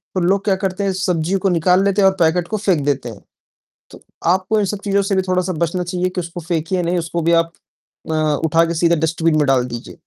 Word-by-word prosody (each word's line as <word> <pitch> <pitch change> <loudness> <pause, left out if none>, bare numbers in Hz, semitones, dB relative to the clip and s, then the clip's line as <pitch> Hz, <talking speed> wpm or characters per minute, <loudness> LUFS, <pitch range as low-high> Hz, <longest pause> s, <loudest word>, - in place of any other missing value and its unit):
तो - - +1
लोग 195 +3 +1
क्या 195 - +2
करते 190 0 -3
हैं 195 - +1
सब्ज़ी 180 -1 -1
को - - +4
निकाल 180 +2 +3
लेते 200 0 +2
हैं 195 - +6
और 190 - -5
पैकेट 170 +1 +2
को 215 - -2
फेंक 185 -7 +1
देते 135 -4 -1
हैं, 105 - -10 0.7
तो - - -14 0.3
आपको 190 +4 0
इन 205 - +1
सब 200 +1 -3
चीज़ों 200 0 +2
से 195 0 -1
भी 190 - +2
थोड़ा-सा 185 0 0
बचना 170 +3 -1
चाहिए 180 +1 -2
कि 180 0 -3
उसको 170 +1 -7
फेंकिए 170 +2 -2
नहीं, 175 +1 0
उसको 170 0 -3
भी 170 +1 +1
आप 165 - -16 0.6
अ, - - 0 0.3
उठाकर 165 +1 +2
सीधा 170 +1 +2
डस्टबिन 165 -1 +1
में 150 - +2
डाल 130 -2 +2
दीजिए। 120 -1 -8
175 Hz, 240 wpm, -19 LUFS, 165-190 Hz, 0.7 s, हैं